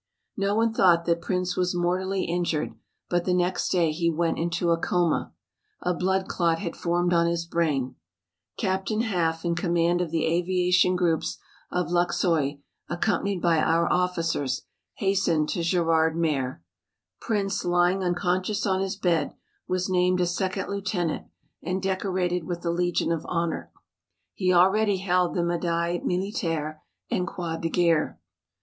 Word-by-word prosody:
No 200 +1 0
one 225 0 +2
thought 170 -5 +4
that 170 0 +1
Prince 180 0 -1
was 180 0 0
mortally 185 +2 0
injured 170 -3 -1 0.3
but 175 -1 0
the 180 - +2
next 180 +1 0
day 170 -4 +2
he 170 +2 0
went 165 +1 0
into 170 +1 0
a 165 - +3
coma. 175 -1 0 0.5
A 180 - +1
blood 190 +2 0
clot 170 -2 +1
had 170 -2 -5
formed 175 +1 0
on 170 0 +3
his 170 0 -1
brain. 150 -7 0 0.6
Captain 195 +2 0
Haff 170 -7 -1
in 170 - +1
command 170 0 +1
of 175 - -2
the 165 0 0
aviation 180 +2 +2
groups 170 -3 0 0.3
of 180 -1 -1
Luxeuil, 170 -4 +1 0.3
accompanied 185 +1 -1
by 170 -2 +3
our 165 +2 +2
officers, 165 -7 0 0.3
hastened 185 -6 +1
to 175 - -1
Gerardmer. 160 - +1 0.6
Prince 200 -2 -1
lying 175 +2 +2
unconscious 185 +3 0
on 190 -1 +1
his 195 +1 -2
bed, 175 -5 0 0.3
was 185 0 0
named 180 -1 +2
a 180 - +3
second 185 +2 -2
lieutenant 195 -4 -2 0.3
and 185 +1 -2
decorated 185 -2 -1
with 175 0 -4
the 170 - -1
Legion 175 0 0
of 165 -2 -1
Honor. 170 -1 -2 0.6
He 185 -2 +1
already 195 +3 +4
held 180 -2 +1
the 175 - +1
Médaille 170 0 -1
Militaire 165 -5 -2 0.3
and 185 -7 0
Croix 170 -2 -4
de 165 0 -2
Guerre. 165 -3 +1
175 Hz, 145 wpm, -26 LUFS, 170-185 Hz, 0.6 s, thought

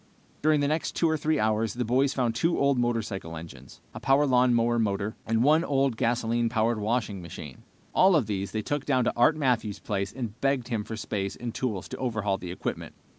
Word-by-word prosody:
During 155 -1 +3
the 140 - +2
next 155 +2 -1
two 170 - +2
or 160 - +2
three 155 0 0
hours 110 0 0
the 125 0 -1
boys 130 +4 +2
found 120 -3 0
two 165 +8 +1
old 140 -2 +2
motorcycle 105 -8 -2
engines, 70 -5 -11
a - - -7
power 135 +2 +3
lawn 125 -2 +4
mower 120 0 +2
motor, 100 -1 -1
and 115 +1 +2
one 155 +4 +4
old 135 -5 +1
gasoline 115 0 0
powered 115 0 +1
washing 105 -2 -1
machine. 80 -5 -9 0.3
All 190 0 +5
of 145 -7 +3
these 100 -2 -3
they 110 -1 -2
took 145 +3 -2
down 130 -3 +2
to - - 0
Art 125 +6 +4
Matthews' 120 -8 0
place 100 -1 -3
and 115 0 -6
begged 135 -3 0
him 110 -4 -1
for 110 +1 -6
space 100 -3 -3
and 120 -1 -5
tools 100 -9 -3
to - - -6
overhaul 105 -6 -1
the 90 - -7
equipment. 90 - -5
115 Hz, 215 wpm, -27 LUFS, 105-135 Hz, 0.3 s, All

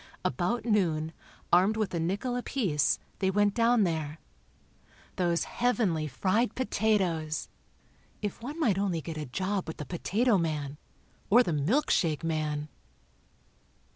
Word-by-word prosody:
About 180 - 0
noon, 165 -8 +1 0.4
armed 190 +5 +5
with 215 -4 -1
a 170 - 0
nickel 200 +9 -1
apiece, 210 - +1 0.2
they 190 - +2
went 205 +1 +2
down 230 0 +4
there. 160 -4 -2 1.0
Those 175 -2 +1
heavenly 215 -11 0
fried 190 - 0
potatoes! 190 -10 0 0.7
If 205 0 -4
one 290 +7 -6
might 210 - +2
only 185 -5 0
get 165 +1 -6
a 150 - -5
job 190 +8 -2
with 160 - -6
the 150 - -5
potato 205 - +1
man. 150 -3 -2 0.5
Or 240 +5 +7
the 170 - -1
milk 195 - +1
shake 160 -3 +1
man.... 155 -2 -1
185 Hz, 135 wpm, -29 LUFS, 160-220 Hz, 1.0 s, Or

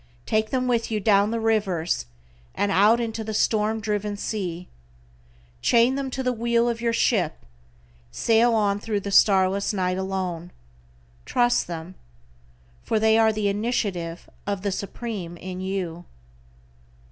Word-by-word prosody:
Take 215 0 0
them 255 -1 0
with 235 -2 0
you 215 -2 -1
down 200 0 +3
the 230 +1 -1
rivers, 190 - 0 0.5
and 205 0 0
out 210 +5 +5
into 225 -1 -3
the 220 0 -4
storm 215 +1 +1
driven 210 -1 -2
sea. 180 -5 -4 0.9
Chain 235 +2 +4
them 275 0 -3
to 265 +1 -4
the 250 -1 +1
wheel 235 0 +1
of 235 -1 -2
your 235 -1 +1
ship, 190 - 0 0.7
sail 230 - +3
on 205 -2 +1
thru 210 -1 -2
the 200 0 -5
starless 195 0 +4
night 185 -1 -1
alone. 185 -3 -3 0.7
Trust 240 - +1
them, 170 +1 -6 0.9
for 220 - 0
they 220 0 +4
are 225 -1 +5
the 215 -1 -1
initiative 200 -5 -2 0.2
of 200 -1 -2
the 200 - 0
Supreme 195 -3 -5
in 185 +1 -7
you. 180 -3 -4
210 Hz, 145 wpm, -24 LUFS, 190-225 Hz, 0.9 s, out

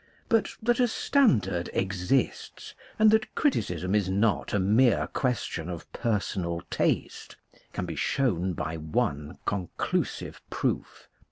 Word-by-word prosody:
But 225 -2 +2
that 240 +2 +2
a 250 - +5
standard 140 - +2
exists, 95 +6 -1 0.2
and 215 0 +6
that 215 0 +1
criticism 90 - 0
is 105 -3 +2
not 100 +3 +1
a - - +2
mere 110 +6 +4
question 110 - -1
of 85 -2 -7
personal 95 -6 -1
taste, - - -1 0.4
can 90 - -3
be 85 -2 -5
shown 95 - 0
by 80 0 -3
one 75 -2 -2
conclusive 95 -4 -2
proof. - - -3
100 Hz, 120 wpm, -28 LUFS, 85-135 Hz, 0.4 s, and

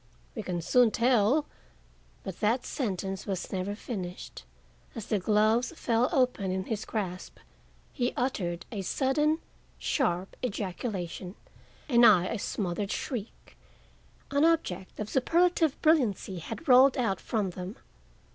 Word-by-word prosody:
We - - -4
can 175 -2 -3
soon 245 +5 +5
tell—" 245 +5 +3 0.8
But 190 -3 -7
that 230 +4 +1
sentence 195 -6 -3
was 190 -2 -3
never 190 +2 -2
finished. 185 - -7 0.5
As 225 - -5
the 210 - 0
gloves 215 - +2
fell 235 -4 +1
open 250 -7 +1
in 185 0 -1
his 215 +1 -4
grasp 185 -4 -4 0.6
he 245 -2 0
uttered 180 -9 -2
a 210 -4 -3
sudden, 295 - +1 0.4
sharp 190 - -1
ejaculation 190 -4 -4 0.5
and 240 -4 +4
I 200 -6 +7
a 220 +3 -3
smothered 195 -2 -2
shriek. 235 -6 -5 0.8
An 285 +1 +2
object 250 - 0
of 210 - -3
superlative 325 +4 +2
brilliancy 240 - +2
had 225 - -8
rolled 260 +1 +7
out 215 -7 0
from 210 -5 -1
them. 180 +4 -7
215 Hz, 130 wpm, -29 LUFS, 190-255 Hz, 0.8 s, I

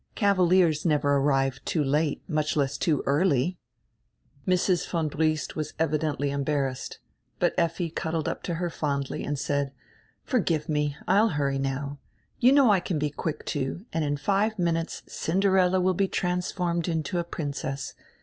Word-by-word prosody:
Cavaliers 180 -5 +3
never 145 -3 +2
arrive 135 -1 +1
too 155 - 0
late, 145 +2 0
much 155 -2 0
less 140 -1 +1
too 155 -5 +1
early." 150 +2 +2 0.9
Mrs. 180 -1 +2
von 165 -3 0
Briest 155 +1 0
was 155 -1 -4
evidendy 150 -2 0
embarrassed. 140 -2 -2 0.4
But - - +2
Effi 170 0 0
cuddled 160 -1 -2
up - - -3
to 170 - 0
her 175 0 -2
fondly 140 -4 -2
and 145 0 -2
said: 140 0 -1 0.5
"Forgive 170 - 0
me, 150 -1 0
I 195 +3 +5
will 225 - +3
hurry 140 -5 0
now. 140 +1 -3 0.4
You 250 +2 +6
know 275 -5 +6
I 195 - +4
can 175 -2 -2
be 150 0 -1
quick, 155 +1 -4
too, 145 +7 -3
and 165 - 0
in 145 -1 0
five 205 +7 +1
minutes 165 -2 -1
Cinderella 185 +1 +2
will 185 +1 +2
be 195 +2 +1
transformed 180 -2 -1
into 165 +1 -1
a - - 0
princess. 140 -4 -4
160 Hz, 160 wpm, -27 LUFS, 145-180 Hz, 0.9 s, You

